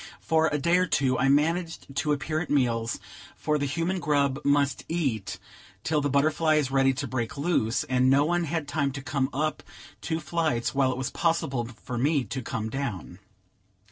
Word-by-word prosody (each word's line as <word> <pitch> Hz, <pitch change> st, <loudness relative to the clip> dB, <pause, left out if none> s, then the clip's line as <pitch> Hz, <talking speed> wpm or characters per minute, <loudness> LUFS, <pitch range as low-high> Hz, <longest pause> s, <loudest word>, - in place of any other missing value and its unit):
For 160 Hz, 0 st, +2 dB
a 150 Hz, -, 0 dB
day 170 Hz, +5 st, +3 dB
or 185 Hz, -, +2 dB
two 130 Hz, -4 st, +1 dB
I 135 Hz, -, +3 dB
managed 165 Hz, 0 st, 0 dB
to 150 Hz, -, +1 dB
appear 155 Hz, +2 st, -1 dB
at 165 Hz, -, -4 dB
meals; 120 Hz, -5 st, +1 dB, 0.4 s
for 150 Hz, 0 st, 0 dB
the 145 Hz, -, 0 dB
human 165 Hz, +6 st, -1 dB
grub 145 Hz, -2 st, +1 dB
must 140 Hz, 0 st, +2 dB
eat 140 Hz, -, -1 dB, 0.5 s
till 155 Hz, -2 st, +1 dB
the 145 Hz, -, 0 dB
butterfly 155 Hz, +3 st, +2 dB
is 145 Hz, -4 st, +1 dB
ready 135 Hz, 0 st, +4 dB
to 140 Hz, +1 st, -3 dB
break 120 Hz, 0 st, -3 dB
loose, 140 Hz, -7 st, +1 dB
and 130 Hz, 0 st, +2 dB
no 140 Hz, +2 st, +4 dB
one 175 Hz, +1 st, +1 dB
had 160 Hz, -1 st, -2 dB
time 145 Hz, -1 st, 0 dB
to 135 Hz, -1 st, -6 dB
come 135 Hz, -2 st, -1 dB
up 150 Hz, +3 st, -1 dB, 0.4 s
two 160 Hz, -1 st, -2 dB
flights 155 Hz, -6 st, -1 dB
while 135 Hz, -2 st, +2 dB
it 125 Hz, -, -4 dB
was 130 Hz, -1 st, -3 dB
possible 150 Hz, -8 st, 0 dB, 0.2 s
for 125 Hz, -3 st, -4 dB
me 145 Hz, +1 st, +2 dB
to 130 Hz, +1 st, -5 dB
come 115 Hz, -2 st, -3 dB
down. 115 Hz, -9 st, -4 dB
140 Hz, 190 wpm, -27 LUFS, 130-155 Hz, 0.5 s, ready